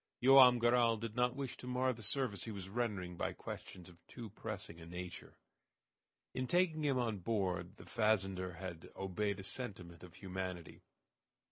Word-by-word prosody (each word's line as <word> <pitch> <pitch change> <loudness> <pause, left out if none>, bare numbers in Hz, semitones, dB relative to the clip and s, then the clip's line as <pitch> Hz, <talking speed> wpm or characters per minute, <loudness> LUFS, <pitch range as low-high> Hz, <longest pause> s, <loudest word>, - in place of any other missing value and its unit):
Joam 130 -1 +9
Garral 120 -1 +4
did 110 0 -5
not 125 0 +2
wish 135 -3 -4
to 125 - -9
mar 125 +1 +1
the 115 - -11
service 110 -3 -1
he 115 - -4
was 95 -2 -6
rendering 100 -6 -2
by - - -1
questions 90 -2 -8
of 85 -1 -17
too 115 -5 -8
pressing 105 -5 -6
a - - -9
nature. 90 0 -7 1.0
In 130 0 -2
taking 175 -2 +2
him 140 -3 +2
on 115 -5 0
board 95 -3 -1
the - - -11
fazender 95 -5 +1
had 85 -2 -7
obeyed 100 +1 -1
a - - -6
sentiment 95 -7 -4
of 90 -3 -12
humanity. 95 -3 -5
105 Hz, 165 wpm, -36 LUFS, 90-125 Hz, 1.0 s, Joam